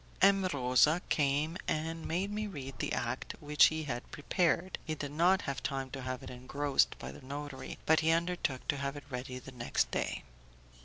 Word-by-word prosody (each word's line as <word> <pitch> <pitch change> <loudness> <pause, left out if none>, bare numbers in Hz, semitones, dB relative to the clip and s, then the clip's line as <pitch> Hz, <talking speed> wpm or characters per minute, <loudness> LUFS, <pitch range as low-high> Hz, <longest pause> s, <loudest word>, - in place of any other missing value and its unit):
M. 195 -1 +6
Rosa 135 +4 +4
came 150 +3 +2
and 160 +1 -2
made 185 +5 -1
me 210 +1 -2
read 135 -8 -7
the - - -1
act 120 +2 -2
which 150 0 +6
he 160 0 -2
had 125 -4 -4
prepared; 175 +4 +1
he 155 -1 -3
had 145 -1 -3
not 175 +5 +4
had 140 -1 -3
time 135 -2 -2
to 135 - -5
have 130 0 -4
it - - -7
engrossed 135 +3 +1
by 65 - -6
the 70 - -12
notary, 140 0 -6
but 160 0 +5
he 160 - +2
undertook 165 -5 0
to 145 - +2
have 140 +1 -3
it 145 - -8
ready 125 0 -4
the 130 +1 -9
next 120 -2 0
day. - - -2
145 Hz, 195 wpm, -33 LUFS, 130-165 Hz, -, M